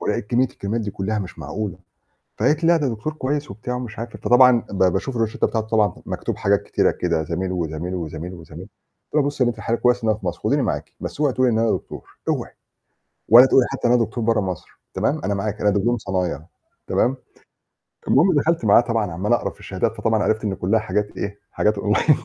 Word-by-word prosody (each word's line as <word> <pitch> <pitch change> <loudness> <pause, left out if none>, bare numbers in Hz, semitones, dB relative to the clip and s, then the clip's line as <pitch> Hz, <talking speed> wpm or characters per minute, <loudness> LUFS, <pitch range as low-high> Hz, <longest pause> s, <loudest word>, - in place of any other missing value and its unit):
ولقيت 105 - -2
كمّية 125 +2 +3
الكريمات 110 +1 -4
دي 105 -2 -3
كلّها 105 +3 -2
مش 95 -4 -6
معقولة، 90 +6 -5 0.6
فقالت 155 +2 +1
لي: - - +4
"لا، 170 - +5
ده 150 -4 0
دكتور 120 +7 -3
كويس،" 145 -2 -3
وبتاع 120 +5 -4
مش 120 -4 -7
عارفة. 115 0 -7
فطبعًا 125 -1 +5
ب 95 -1 +1
باشوف 95 +8 0
الروشتّة 115 -1 0
بتاعته 110 -1 -2
طبعًا 105 -4 +2
مكتوب - - -3
حاجات - - +1
كتيرة - - +1
كده 85 -3 -1
زميل، 90 +4 -3
وزميل، 85 +1 -3
وزميل، 85 +1 -5
وزميل، 80 -3 -11 0.5
قُلت - - -4
لها: - - +3
"بُصّي 145 -2 0
يا 120 - +2
بنت 120 - -5
الحلال 115 +2 -2
كويس 125 0 +2
إن 110 - +1
أنا 110 - +2
في - - -11
مصر، 85 -2 -3
خُديني - - +1
معاكِ، - - -3
بس - - -6
اوعي 145 -4 +2
تقول 130 +2 +2
لي 120 - +2
إن 110 - +1
أنا 115 -1 +2
دكتور، - - -6
اوعي، - - -1 0.8
ولا 120 +4 +9
تقول 130 - +5
لي 120 - +1
حتّى - - -1
إن 120 - +4
أنا 120 -1 +4
دكتور 110 +1 -4
برّه 115 -1 +2
مصر، 95 -4 -6
تمام، - - 0
أنا 100 +2 0
معاكِ، 105 +1 -3
أنا 105 - +3
دبلوم 105 +5 +1
صنايع 90 -7 -2 0.5
تمام." 130 +2 +1 0.9
المهم 175 +7 +4
دَخَلت 155 -2 +1
معاها 105 +2 +7
طبعًا 115 -5 -1
عَمّال 95 +7 0
أقرا 120 - +1
في - - -16
الشهادات - - -2
فطبعًا 110 -1 +1
عرفت 110 0 0
إن 100 -2 -1
كلّها 100 +5 +1
حاجات 105 0 -2
إيه، 100 0 -4
حاجات 105 -1 +1
Online. 105 +9 +2
110 Hz, 225 wpm, -22 LUFS, 95-120 Hz, 0.9 s, ولا